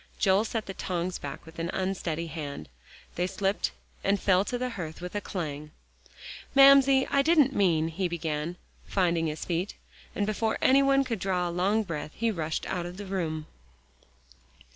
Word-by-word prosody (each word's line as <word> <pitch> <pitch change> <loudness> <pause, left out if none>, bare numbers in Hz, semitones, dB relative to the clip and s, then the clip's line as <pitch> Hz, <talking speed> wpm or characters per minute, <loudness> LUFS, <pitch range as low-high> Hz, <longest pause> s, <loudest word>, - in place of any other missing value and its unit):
Joel 195 +2 +3
set 225 -1 -3
the 195 - -6
tongs 180 -1 -3
back 140 -1 -7
with 160 +1 -12
an 165 +1 -2
unsteady 180 -4 -2
hand. 145 - -6 0.4
They 180 +1 -1
slipped 195 +1 0 0.3
and 200 +1 +2
fell 185 -1 +3
to 245 - -2
the 250 0 -2
hearth 165 -8 -6
with 180 +1 -7
a 205 - -2
clang. 150 -6 -5 0.9
"Mamsie, 275 -1 +7
I 280 - +4
didn't 295 -3 +4
mean," 165 -7 +2
he 180 +3 -1
began, 165 -1 -3 0.3
finding 170 -4 +1
his 155 0 -4
feet. 175 +3 -2 0.4
And 205 - 0
before 220 +1 0
any 270 +1 +5
one 275 0 +4
could 235 -5 -3
draw 180 -1 0
a - - -3
long 195 +5 +1
breath, 155 -5 -5
he 230 -1 0
rushed 160 -5 -3
out 175 -1 -3
of 175 +1 -9
the 205 - -6
room. 165 -5 -3
185 Hz, 175 wpm, -28 LUFS, 165-215 Hz, 0.9 s, Mamsie